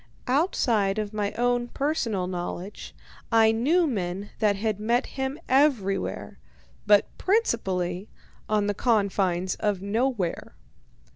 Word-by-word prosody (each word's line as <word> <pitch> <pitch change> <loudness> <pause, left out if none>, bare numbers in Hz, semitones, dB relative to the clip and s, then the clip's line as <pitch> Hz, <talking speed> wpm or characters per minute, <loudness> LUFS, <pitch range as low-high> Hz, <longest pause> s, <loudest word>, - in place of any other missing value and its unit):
Outside 240 - +1
of 215 -1 -3
my 205 -1 -1
own 245 0 +1
personal 240 -9 -1
knowledge, 180 +2 -6 0.4
I 225 -1 +5
knew 295 +11 +2
men 195 - -3
that 210 -2 +3
had 210 0 -2
met 235 +3 +1
him 265 +2 -4
everywhere, 260 -8 +1 0.5
but 205 -1 +4
principally 195 - 0 0.4
on 210 -1 +2
the 205 - 0
confines 195 -5 +1
of 205 -3 -1
Nowhere. 215 -3 -1
215 Hz, 115 wpm, -26 LUFS, 195-245 Hz, 0.5 s, I